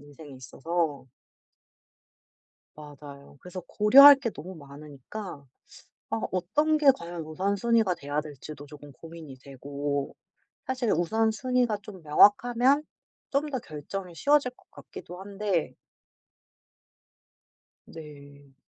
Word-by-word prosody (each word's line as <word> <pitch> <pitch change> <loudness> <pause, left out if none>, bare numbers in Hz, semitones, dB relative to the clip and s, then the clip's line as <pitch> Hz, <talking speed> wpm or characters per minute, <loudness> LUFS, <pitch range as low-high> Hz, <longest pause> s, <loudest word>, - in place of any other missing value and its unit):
인생에 145 0 -14
있어서. 145 +2 -3 1.7
맞아요. 145 -1 -13
그래서 180 +1 -8
고려할 275 +7 +8
게 270 -4 -3
너무 185 +3 -10
많으니까 145 +3 -10 0.7
아 115 - -2
어떤 290 - +1
게 300 -2 0
과연 170 0 -7
우선순위가 200 +5 0
돼야 145 0 -3
될지도 150 0 -10
쪼금 145 0 -13
고민이 160 -2 -12
되고 140 +1 -5 0.5
사실 255 -4 -1
우선순위가 220 +6 0
좀 190 -3 -11
명확하면 240 - +4 0.5
좀 285 +2 0
더 260 - -3
결정이 175 +1 -8
쉬워질 285 - +2
것 250 - -29
같기도 180 +1 -11
한데 200 -3 -2 2.1
네. 145 -3 -14
170 Hz, 230 characters per minute, -27 LUFS, 145-220 Hz, 2.1 s, 고려할